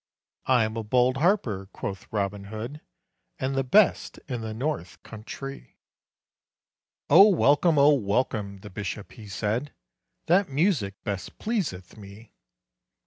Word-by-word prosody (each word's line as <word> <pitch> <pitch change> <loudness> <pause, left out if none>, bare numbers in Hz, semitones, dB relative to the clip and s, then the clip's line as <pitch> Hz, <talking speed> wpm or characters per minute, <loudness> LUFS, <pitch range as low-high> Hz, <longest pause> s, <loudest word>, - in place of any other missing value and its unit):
"I 125 -3 +4
am 110 +1 -3
a 115 - -2
bold 125 +4 +2
harper," 135 - +1
quoth 95 -1 -6
Robin 100 -1 -2
Hood, 115 +8 -7 0.6
"And 130 +1 -2
the 135 0 0
best 195 +10 +3
in 125 -4 -4
the 110 -1 -5
north 110 - -4
country." 135 +5 -9 1.3
"Oh 190 +8 +8
welcome, 155 -2 +3
oh 145 +1 +6
welcome," 105 -4 -1
the 105 - -10
bishop 105 +1 -6
he 110 -4 -12
said: 110 +7 -3 0.5
"That 180 +2 +3
music 140 - +1
best 100 -4 -5
pleaseth 160 - -3
me." 105 +2 -13
115 Hz, 130 wpm, -26 LUFS, 100-145 Hz, 1.3 s, Oh